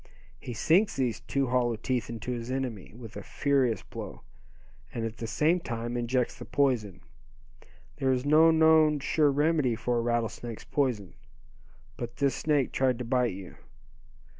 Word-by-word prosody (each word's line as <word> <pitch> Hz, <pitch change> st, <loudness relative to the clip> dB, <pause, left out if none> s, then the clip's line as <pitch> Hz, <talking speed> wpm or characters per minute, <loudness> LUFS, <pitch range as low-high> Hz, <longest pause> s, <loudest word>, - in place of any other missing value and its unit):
He 120 Hz, -, -7 dB
sinks 180 Hz, -, +3 dB
these 120 Hz, -4 st, -1 dB
two 135 Hz, +5 st, -1 dB
hollow 120 Hz, -2 st, +1 dB
teeth 120 Hz, +2 st, -2 dB
into 115 Hz, +1 st, -5 dB
his 120 Hz, -1 st, -4 dB
enemy, 130 Hz, -7 st, -4 dB
with 115 Hz, -3 st, -10 dB
a -, -, -5 dB
furious 135 Hz, -7 st, 0 dB
blow, -, -, -8 dB, 0.7 s
and 115 Hz, -1 st, -3 dB
at 115 Hz, 0 st, -5 dB
the 115 Hz, -, -5 dB
same 155 Hz, +10 st, +2 dB
time 120 Hz, -6 st, -4 dB
injects 120 Hz, +1 st, 0 dB
the -, -, -6 dB
poison. 120 Hz, -10 st, 0 dB, 1.0 s
There 135 Hz, -1 st, +1 dB
is 130 Hz, +1 st, 0 dB
no 155 Hz, +3 st, +6 dB
known 160 Hz, -1 st, +5 dB
sure 150 Hz, +2 st, +2 dB
remedy 145 Hz, -3 st, +2 dB
for 120 Hz, +2 st, -1 dB
a -, -, 0 dB
rattlesnake's 115 Hz, -1 st, -3 dB
poison. 120 Hz, -, -1 dB, 0.8 s
But 120 Hz, 0 st, -6 dB
this 140 Hz, +1 st, +1 dB
snake 145 Hz, -4 st, +1 dB
tried 130 Hz, -2 st, +1 dB
to 125 Hz, -, -5 dB
bite 125 Hz, -2 st, +1 dB
you. 95 Hz, -2 st, -10 dB
125 Hz, 160 wpm, -28 LUFS, 115-140 Hz, 1.0 s, no